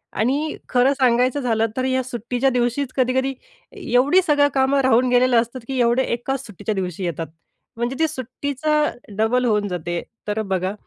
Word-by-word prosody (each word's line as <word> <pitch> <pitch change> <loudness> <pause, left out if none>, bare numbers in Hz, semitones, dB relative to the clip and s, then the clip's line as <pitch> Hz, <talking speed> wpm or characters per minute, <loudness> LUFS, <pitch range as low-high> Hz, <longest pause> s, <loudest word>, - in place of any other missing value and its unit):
आणि 280 +8 0
खरं 255 +2 +3
सांगायचं 255 0 +2
झालं, 225 -3 +1
तर 255 - 0
या 260 0 +1
सुट्टीच्या 245 +1 -1
दिवशीच 250 +2 -1
कधीकधी 260 +1 +1 0.6
एवढी 280 +9 +5
सगळी 290 -1 +4
कामं 270 +1 +2
राहून 255 -1 +3
गेलेली 250 0 +3
असतात, 235 +2 0
की 265 -1 -2
एवढं 240 +2 +3
एकाच 265 +3 -3
सुट्टीच्या 210 0 -4
दिवशी 185 -1 -3
येतात, 165 -1 -3 0.5
म्हणजे 240 +3 -2
ती 320 - +3
सुट्टीचा 285 +3 -3 0.4
डबल 240 +4 +2
होऊन 210 -3 +1
जाते. 175 -2 -3 0.3
तर 210 +1 -1
बघा, 185 +1 -1
250 Hz, 160 wpm, -21 LUFS, 225-265 Hz, 0.6 s, एवढी